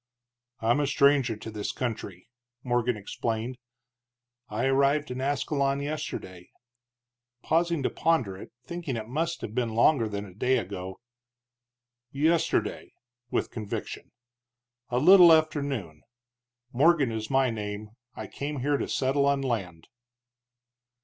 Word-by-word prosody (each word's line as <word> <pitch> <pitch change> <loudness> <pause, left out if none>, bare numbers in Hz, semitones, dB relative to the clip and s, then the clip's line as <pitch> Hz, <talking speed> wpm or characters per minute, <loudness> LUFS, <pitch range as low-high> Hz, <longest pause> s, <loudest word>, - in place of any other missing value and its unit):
"I'm 115 +5 +2
a 145 - +1
stranger 140 -4 +3
to 110 - -8
this 105 -1 -3
country," 110 -7 -5 0.4
Morgan 120 -2 0
explained, 115 +4 -4 0.9
"I 110 +4 -1
arrived 140 +2 +2
in 125 +1 -4
Ascalon 140 0 0
yesterday 140 - -5 0.5
" 120 0 -57
pausing 165 -2 +1
to - - +1
ponder 130 -13 +1
it, 95 - -11
thinking 170 -7 -4
it 110 -1 -6
must 165 +7 -2
have 105 - -6
been 115 -2 -1
longer 115 -1 +4
than 100 0 -4
a 95 - -13
day 125 +7 +1
ago 95 -4 -5 1.1
"yesterday" 160 +4 0 0.4
with - - -1
conviction, 110 -3 -6 0.8
"a 120 - -1
little 175 +4 +8
after 155 -2 +3
noon. 105 - -5 0.7
Morgan 145 -1 +4
is 110 -1 -4
my 135 -2 +2
name. 105 -1 -5 0.2
I - - -6
came 145 -1 -5
here 145 +2 +1
to - - -3
settle 140 +1 +1
on 140 -1 +2
land." 95 -10 -3
125 Hz, 130 wpm, -27 LUFS, 110-145 Hz, 1.1 s, little